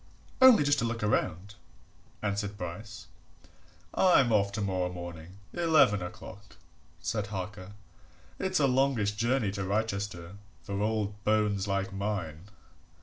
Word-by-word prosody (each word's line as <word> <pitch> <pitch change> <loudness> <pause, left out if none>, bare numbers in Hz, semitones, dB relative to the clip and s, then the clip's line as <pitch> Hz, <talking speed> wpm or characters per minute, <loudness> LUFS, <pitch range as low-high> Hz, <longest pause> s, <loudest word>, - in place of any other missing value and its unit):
"Only 260 -10 +8
just 145 -1 +2
to 115 - 0
look 115 -1 -3
round," 100 -1 -1 0.7
answered 100 0 -2
Bryce. 90 +4 -7 0.9
"I'm 135 -11 +4
off 100 -1 +2
tomorrow 95 -3 -1
morning 85 0 -9 0.2
eleven 160 - +4
o'clock," 95 +3 -9 0.4
said 105 -3 -2
Harker. 95 0 -6 0.7
"It's 185 -2 0
a 145 - +4
longish 130 -5 +2
journey 115 0 0
to 100 0 -4
Wrychester 100 -3 -3 0.3
for 100 0 -3
old 105 -1 -2
bones 105 -2 +1
like 100 0 -1
mine." 95 -5 -3
105 Hz, 120 wpm, -29 LUFS, 95-110 Hz, 0.9 s, Only